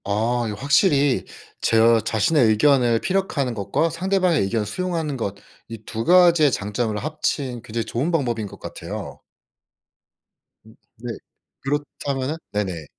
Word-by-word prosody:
아 115 +4 0
이거 105 - -4
확실히 140 - +2 0.4
제 115 0 +4
자신의 115 +6 +2
의견을 120 +1 +3
피력하는 175 -9 -1
것과 140 +10 -1
상대방의 180 -1 +1
의견을 105 +2 -1
수용하는 160 - -3
것 100 -6 -3 0.3
이 115 - -6
2 115 0 -4
가지의 170 -5 +5
장점을 105 +1 -2
합친 140 -2 -3
굉장히 115 0 -4
좋은 130 +9 -2
방법인 120 -9 -1
것 - - -13
같아요. - - -7 1.4
음 110 +1 -17 0.2
네. 120 +1 -6 0.5
그렇다면은 140 0 -3 0.2
네네. 95 -6 -3
125 Hz, 280 characters per minute, -22 LUFS, 110-155 Hz, 1.4 s, 가지의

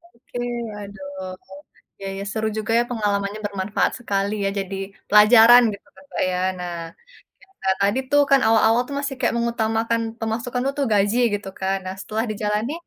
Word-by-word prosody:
Oke, 240 +1 -11 0.4
waduh, 190 -2 -8 0.7
ya 195 - -5
ya - - -4
seru 220 -1 -1
juga 215 +1 -2
ya - - +3
pengalamannya 205 -2 -1
bermanfaat 200 0 -1
sekali 200 -1 -1
ya, - - +2
jadi 195 0 -4 0.3
pelajaran 225 +3 +8
gitu 200 - -12
kan, 190 - -17
Mbak, - - 0
ya. 180 - -1 0.2
Nah, 175 -1 -4 0.7
cerita 385 - -6
tadi 205 +6 +2
tuh 290 0 +6
kan 275 - +7
awal-awal 225 +1 +4
tuh 280 - -4
masih 280 -1 -3
kayak - - +1
mengutamakan 230 0 0 0.2
pemasukan 235 +3 -2
dulu 275 +1 -1
tuh 275 - +1
gaji 205 +3 +2 0.2
gitu 200 -1 -6
kan. 195 0 0
Nah 185 - -3
setelah 220 +2 -2
dijalani, 210 +5 -2
215 Hz, 170 wpm, -22 LUFS, 200-235 Hz, 0.7 s, pelajaran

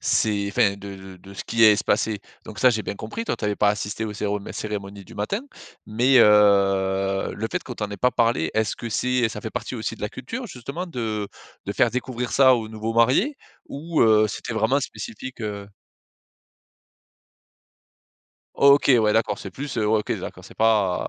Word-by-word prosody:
c'est, 100 -2 +1
enfin 100 0 +2
de 100 0 -8
de 95 -1 -12
de 95 +2 -14
ce - - -7
qui 115 -1 +3
allait 105 -1 +7
se - - -3
passer, 105 0 0 0.3
donc 105 -2 -10
ça 130 - +5
j'ai 110 -2 -1
bien 100 - -5
compris 215 - -6
toi - - -2
tu - - -6
avais 105 0 0
pas 105 - +3
assisté 105 +1 -3
aux 105 - -4
cérémo 105 0 -2
cérémonies 100 -2 -6
du - - -14
matin. 105 - -2 0.5
Mais 125 +4 +3
heu, 95 -2 +3
le 110 - -3
fait - - -2
qu'on 125 - -8
t'en 105 -2 -4
ait 100 - -5
pas 125 +7 +2
parlé, 115 -9 +1
est-ce 110 -2 0
que 120 - -6
c'est 125 +1 +1
ça 105 -1 -7
fait 110 - -6
partie 125 - -5
aussi 110 0 -3
de 110 - -13
la 105 - -1
culture 230 - -7
justement 140 - -6
de 110 - -3 0.4
de - - -3
faire - - +2
découvrir 125 -1 -4
ça 130 -2 +6
aux 110 -2 -5
nouveaux 110 +1 -4
mariés? 135 - +3 0.3
Ou 160 +3 -3
heu, 110 -1 +5
c'était 115 - -5
vraiment 110 +6 +2
spécifique, 130 - -7
heu? 100 -2 -5 2.9
OK, 140 +1 +5
ouais 105 -1 +2
d'accord, 110 -2 +1
c'est 95 - -8
plus 140 +8 -6
heu 105 - +1
ouais 110 0 +3
OK 105 - -2
d'accord, - - -7
c'est - - -14
pas 105 -5 +2
110 Hz, 200 wpm, -23 LUFS, 100-125 Hz, 2.9 s, allait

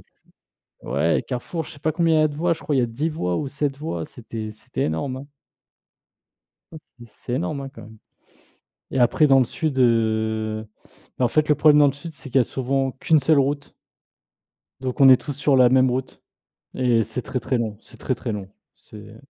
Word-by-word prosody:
c - - -30 0.6
ouais 75 +6 +1
les - - -1
carrefours 150 +6 -4
je - - -11
sais 145 - -14
pas 155 +2 -1
combien 165 0 +2
il - - +4
y - - +4
a - - +3
de 145 - -8
voies, 170 +3 +1
je 165 - -4
crois 145 +1 -1
il - - +2
y 125 - +3
a - - +1
10 125 +8 -2
voies 90 - -2
ou 145 - -2
7 140 0 -2
voies, 85 - -4
c'était 110 -2 -7
c'était 110 - -5
énorme, 80 - -2
hein. 135 +2 -9 1.5
Ouais, 160 - -8 0.2
c'est 120 - -12
c'est 120 - -8
énorme, 145 +1 -2
hein, 135 - -6
quand 115 -4 -13
même 110 +1 -14 0.9
et - - -2
après 125 +5 +4
dans 135 -2 +5
le 130 - +3
sud, 150 +1 -3
heu, 110 -2 +1 0.5
bah, 130 - +1
en - - +3
fait, 155 +5 +1
le 150 - +5
problème 150 0 +5
dans 145 - +7
le 140 - +2
sud 150 +4 -9
c'est 140 - -11
qu'il 135 - +2
y - - +5
a - - -2
souvent 135 +2 -1
qu'une 155 +4 +2
seule 150 +2 +3
route 140 +1 -1 1.1
donc 130 0 -4
on 135 - +8
est 130 - +9
tous 145 - -5
sur 145 0 +1
la 125 -1 +6
même 130 0 +4
route 130 +1 -4 0.5
et 120 -3 +2
c'est 110 +4 -5
très, 130 +1 -4
très 125 +2 -1
long, 110 -3 -3
c'est - - -16
très, - - -2
très - - -5
long, 100 -2 -6 0.2
c'est 105 0 -14
130 Hz, 230 wpm, -23 LUFS, 115-145 Hz, 1.5 s, est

